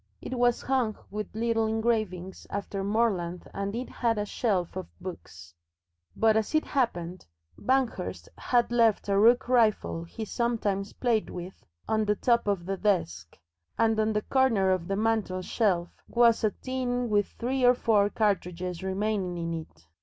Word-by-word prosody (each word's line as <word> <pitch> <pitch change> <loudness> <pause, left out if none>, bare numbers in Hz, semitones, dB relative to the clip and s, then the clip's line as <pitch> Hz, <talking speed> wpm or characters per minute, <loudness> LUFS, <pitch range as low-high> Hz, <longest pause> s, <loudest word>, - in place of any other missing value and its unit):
It - - -6
was 245 -1 +2
hung 250 -5 0
with 210 0 -5
little 225 0 +1
engravings 215 -5 -1
after 200 -1 -4
Morland 195 -5 0
and 200 +1 -3
it 250 +2 -3
had 230 -2 -1
a 210 - -1
shelf 195 -5 -1
of 185 -1 -5
books. 90 - -9 0.6
But 220 -1 +3
as 220 +7 0
it 310 - +3
happened, 180 - -2 0.3
Banghurst 260 +1 -1
had 240 -1 +1
left 230 -4 +3
a 200 0 +3
rook 240 +4 +5
rifle 220 -8 +2
he 220 +6 -6
sometimes 210 -4 -1
played 235 -4 0
with 180 +1 -8 0.2
on 220 0 +1
the 210 0 +2
top 235 0 +2
of 195 -4 0
the 195 +1 -2
desk, 90 - -1 0.4
and 225 -1 +2
on 215 0 +2
the 210 0 0
corner 230 -8 +2
of 180 -2 -1
the 195 - -1
mantelshelf 195 -3 0 0.2
was 235 -1 +4
a 215 - +4
tin 250 +1 -2
with 205 -2 +2
three 255 +2 -1
or 245 0 +6
four 210 -4 +3
cartridges 180 -5 -1
remaining 190 -1 -1
in 165 0 -3
it. 155 - -8
210 Hz, 160 wpm, -28 LUFS, 185-235 Hz, 0.6 s, or